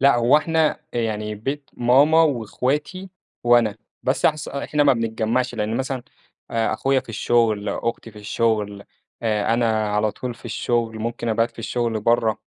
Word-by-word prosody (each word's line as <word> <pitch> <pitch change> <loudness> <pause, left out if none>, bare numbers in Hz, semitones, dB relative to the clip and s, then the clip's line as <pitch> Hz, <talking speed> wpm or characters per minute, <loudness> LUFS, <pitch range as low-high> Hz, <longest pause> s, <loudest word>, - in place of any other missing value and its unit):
لأ، 140 -2 +5
هو 120 +4 +5
إحنا 160 0 +1
يعني 110 -2 -2
بيت 140 +7 -5
ماما 140 +7 +5
وأخواتي 145 - -1 0.3
وأنا، 120 -3 +4 0.3
بس 130 - -1
أحس 155 -1 +2
إحنا 145 +2 -1
ما 140 - +6
بنتجمعش 115 +1 -1
لأن 110 0 -1
مثلًا 130 -1 -3 0.5
آآ، 115 -1 0
أخويا 135 +4 +1
في - - -22
الشغل، 110 -1 +1
أختي 115 +2 -3
في 105 - -13
الشغل، 105 -1 -1 0.4
آآ، 110 0 +1
أنا 110 -3 +1
على 105 0 +2
طول 125 -2 -5
في - - -20
الشغل، 115 0 -1
ممكن 115 +1 -3
أبات 115 +1 +1
في - - -27
الشغل 115 0 -1
برا، 115 0 +2
115 Hz, 160 wpm, -22 LUFS, 110-130 Hz, 0.5 s, ما